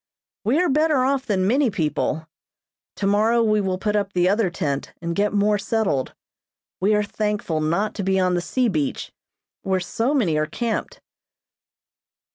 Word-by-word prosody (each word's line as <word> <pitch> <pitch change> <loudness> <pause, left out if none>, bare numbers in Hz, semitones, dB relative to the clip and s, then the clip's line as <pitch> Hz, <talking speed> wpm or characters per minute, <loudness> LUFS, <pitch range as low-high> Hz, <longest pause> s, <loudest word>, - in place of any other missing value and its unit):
We 255 +9 +2
are 360 - +3
better 300 -2 +2
off 275 0 0
than 190 -4 +1
many 255 +5 +3
people. 160 -3 -2 0.7
Tomorrow 215 +4 +2
we 215 -1 +2
will 190 -2 -1
put 210 +2 -1
up 200 -1 -1
the 180 0 +2
other 200 0 +2
tent 145 -6 -3
and 170 0 -3
get 205 +2 +1
more 205 0 +2
settled. 195 - -1 0.6
We 205 +3 +3
are 210 - +2
thankful 210 -6 -2
not 170 +8 0
to 205 - -4
be 190 0 +1
on 185 -1 +2
the 175 - +1
sea 255 +7 0
beach, 155 -9 -2 0.5
where 190 -1 0
so 230 +10 -1
many 180 - +2
are 155 - 0
camped. 230 +7 -3
205 Hz, 165 wpm, -22 LUFS, 180-225 Hz, 0.7 s, are